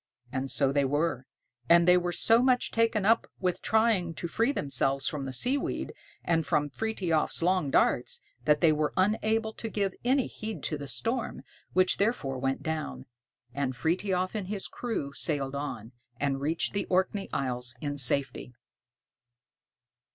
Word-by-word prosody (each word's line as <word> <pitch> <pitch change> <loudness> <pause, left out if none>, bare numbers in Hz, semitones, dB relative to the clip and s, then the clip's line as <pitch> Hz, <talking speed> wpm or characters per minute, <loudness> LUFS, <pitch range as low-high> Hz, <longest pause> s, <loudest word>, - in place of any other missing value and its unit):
And 135 +1 -2
so 135 +1 +2
they 140 0 +2
were; 140 -1 -1 0.4
and 170 0 +6
they 180 - +7
were 175 -1 +1
so 225 +6 +4
much 255 -1 +2
taken 225 -3 +1
up 225 +2 +3
with 180 -1 -1
trying 220 -7 +2
to 170 - -4
free 230 +9 +1
themselves 135 - 0
from 145 -4 -3
the 135 - -4
seaweed 255 - 0 0.3
and 165 -1 +1
from 145 -1 0
Frithiof's 180 -8 -1
long 180 -4 +2
darts, 125 - +2 0.3
that 150 +1 +3
they 165 -3 +6
were 150 0 0
unable 220 +3 +1
to 225 - -6
give 200 -3 -1
any 260 +2 +2
heed 220 0 -6
to 155 - -1
the 140 - -6
storm, 225 - -2 0.3
which 185 0 +3
therefore 175 - 0
went 135 +1 -1
down, 155 - -4 0.5
and 130 -2 -2
Frithiof 185 +4 0
and 205 -4 -4
his 200 -1 -2
crew 215 - -4
sailed 140 -3 -1
on, 125 -6 -5 0.3
and 140 -1 -1
reached 160 +4 -1
the 200 - -1
Orkney 190 +2 0
Isles 125 -3 -2
in 145 +1 -3
safety. 130 -1 0
165 Hz, 160 wpm, -29 LUFS, 140-210 Hz, 0.5 s, they